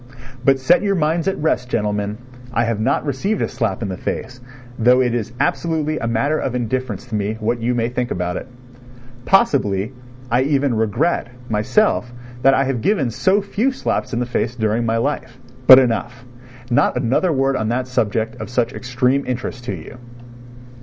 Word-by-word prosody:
But 135 0 +4
set 170 +7 +4
your 200 -1 +1
minds 160 +1 0
at 195 - 0
rest, 135 -5 0
gentlemen, 105 -2 -1 0.3
I 115 0 +1
have 115 -2 -1
not 135 +7 0
received 170 +10 -1
a - - 0
slap 115 -4 -2
in 100 - -3
the 95 - -4
face, 125 +5 -5 0.4
though 125 +3 +5
it 125 -2 +2
is 120 -1 -2
absolutely 160 -3 0
a 115 - -2
matter 120 +7 +1
of 125 - -2
indifference 125 -3 -2
to 125 - -12
me 105 +1 -1
what 115 +2 -1
you 120 +2 0
may 115 -1 +1
think 125 0 -2
about 90 0 -2
it. - - -5 0.8
Possibly, 110 - +2 0.4
I 120 +2 +3
even 140 -1 +1
regret, 115 +9 0 0.2
myself, 120 - +1 0.3
that 135 +1 +5
I 135 - +3
have 130 -4 -2
given 145 - +1
so 195 - +2
few 215 +6 0
slaps 260 - -2
in 120 - -2
the 125 - 0
face 120 0 -2
during 110 0 0
my 115 0 +1
life. 125 -1 -2 0.3
But 130 - +12
enough... 120 -1 0 0.5
not 120 - +3
another 135 +9 +1
word 135 -1 +1
on 110 -2 -1
that 125 +2 -1
subject 115 -2 -1
of - - -6
such 120 0 0
extreme 125 +4 0
interest 125 -1 -4
to - - -3
you. 125 - -11
125 Hz, 185 wpm, -20 LUFS, 115-140 Hz, 0.8 s, But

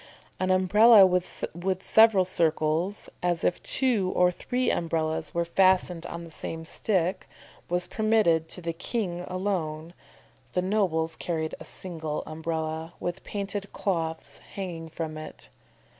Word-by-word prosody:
An 185 - 0
Umbrella 200 +3 +7
with 180 0 -2
several 220 -4 +6
circles, 165 +2 0
as 175 -2 0
if 175 - +1
two 225 -9 +1
or 180 0 +4
three 250 +7 -1
umbrellas 160 -1 -2
were 170 0 +1
fastened 180 -1 +2
on 170 0 -6
the 165 - -11
same 160 +1 -6
stick, 185 0 -1 0.4
was 175 0 0
permitted 215 -8 +2
to 180 - -4
the 165 0 -2
king 180 0 -3
alone, 175 -4 -3 0.6
the 180 - +1
nobles 175 -5 0
carried 160 -2 -3
a - - -10
single 160 -4 -5
Umbrella 160 +1 -4
with 175 +2 -4
painted 200 -1 -4
cloths 165 -4 -3 0.2
hanging 170 -4 -5
from 155 -1 -5
it. 155 - -9
175 Hz, 130 wpm, -27 LUFS, 160-190 Hz, 0.6 s, Umbrella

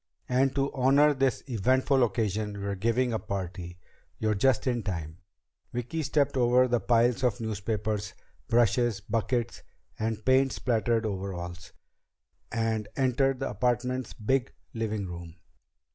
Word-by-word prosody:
And 130 +1 +2
to 140 0 0
honor 140 +3 +4
this 135 -2 0
eventful 130 +3 +2
occasion, 105 -2 -1
we're 100 0 -2
giving 115 +5 +1
a 110 - 0
party. 90 -2 -5 0.4
You're 110 -1 +1
just 120 +4 +2
in 120 -2 0
time." 85 -5 -5 0.5
Vicki 125 +7 -3
stepped 145 -1 +1
over 125 0 +4
the 120 -1 +1
piles 120 +2 +2
of 120 -5 +1
newspapers, 105 -1 -3 0.3
brushes, 120 -1 +2
buckets 115 +3 -2 0.4
and 110 -1 -2
paint 130 +1 +4
splattered 115 -1 0
overalls, 90 -4 -5 0.8
and 110 -2 -1
entered 135 0 +1
the - - -1
apartment's 125 0 -1
big 130 +4 0 0.2
living 110 -3 -2
room. 85 -2 -8
115 Hz, 130 wpm, -28 LUFS, 105-130 Hz, 0.8 s, honor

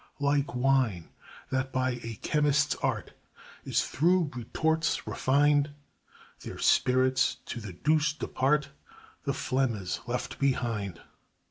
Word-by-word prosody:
Like 140 -2 +1
wine 125 -9 +1 0.4
that 130 0 -1
by 130 0 +1
a 115 -1 -5
chemist's 150 0 +2
art - - -2 0.5
Is - - +1
through 170 +1 +2
retorts 160 +7 0
refined, 145 +1 +2 0.6
Their - - -8
spirits 130 +1 +3
to 120 - -5
the 105 -4 -7
deuce 150 - +2
depart, 150 -1 0 0.6
The 140 - 0
phlegma's 120 -10 -1
left 120 +1 -3
behind. 115 -9 -1
135 Hz, 110 wpm, -29 LUFS, 125-150 Hz, 0.6 s, spirits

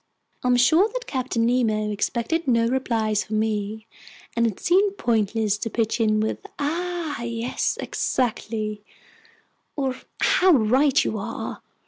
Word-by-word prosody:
I'm 250 0 +3
sure 325 - +5
that - - -4
Captain 255 - -1
Nemo 220 -3 +1
expected 240 +10 -1
no 230 -2 +3
replies 225 -4 0
from 215 0 -3
me, 215 0 -2 0.5
and 235 0 +3
it 210 - -4
seemed 390 +3 +2
pointless 220 - +1
to 225 - -3
pitch 225 +1 -1
in 215 -1 +3
with 215 +1 -1 0.2
"Ah 330 -1 -2
yes," 235 +1 -2
"Exactly," 215 -3 -2 0.9
or 270 -3 -1 0.2
"How 370 -1 +4
right 265 +3 +4
you 220 - -2
are!" 200 - -5
235 Hz, 130 wpm, -24 LUFS, 215-275 Hz, 0.9 s, sure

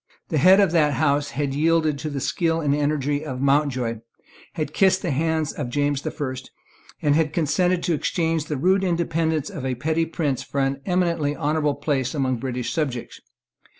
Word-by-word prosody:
The 155 - +1
head 185 +7 +7
of 195 -4 +4
that 150 -4 +3
house 145 +1 +1
had 140 -2 -2
yielded 155 0 +2
to 155 - -4
the 140 -2 -3
skill 165 +4 0
and 145 -3 +1
energy 145 0 0
of 130 -5 -5
Mountjoy, 135 -5 +1 0.5
had 155 -3 -4
kissed 190 0 +3
the 175 - -1
hand 160 +1 0
of 140 -5 -4
James 145 +1 0
the - - -3
First, 130 -2 -5 0.5
and 145 - +3
had 155 0 +1
consented 175 +3 +1
to 170 - +1
exchange 160 0 0
the 150 - -3
rude 190 +7 +2
independence 165 -2 0
of 155 -9 -6
a 130 -1 -1
petty 160 +6 0
prince 150 -5 -2
for 140 - -4
an 135 0 -1
eminently 170 -5 +1
honourable 150 -2 0
place 140 -2 -1
among 130 -3 0
British 125 -1 -3
subjects. 135 -7 -3
150 Hz, 185 wpm, -23 LUFS, 140-165 Hz, 0.5 s, head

